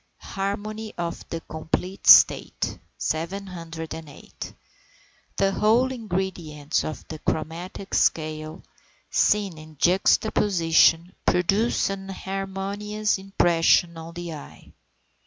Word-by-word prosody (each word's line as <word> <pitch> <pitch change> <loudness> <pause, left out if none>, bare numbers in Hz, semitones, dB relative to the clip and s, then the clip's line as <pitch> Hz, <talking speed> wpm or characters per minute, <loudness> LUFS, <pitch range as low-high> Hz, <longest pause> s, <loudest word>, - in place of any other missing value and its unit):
HARMONY 210 +2 -4
OF 170 -1 -5
THE 165 - -4
COMPLETE 165 +5 -4
STATE. - - +6 0.2
708. 165 -3 -5 0.9
The 195 0 +3
whole 230 +6 +3
ingredients 175 - -2
of 155 - -6
the 155 - -7
chromatic 170 +6 -4
scale, 155 +1 0 0.5
seen 200 -6 +2
in 155 -1 -13
juxtaposition, 175 -2 +3
produce 195 +4 +2
an 195 0 -6
harmonious 195 +2 -3
impression 175 -3 +3
on 165 +1 -9
the 175 -1 -5
eye. 150 - -12
180 Hz, 90 wpm, -25 LUFS, 160-195 Hz, 0.9 s, STATE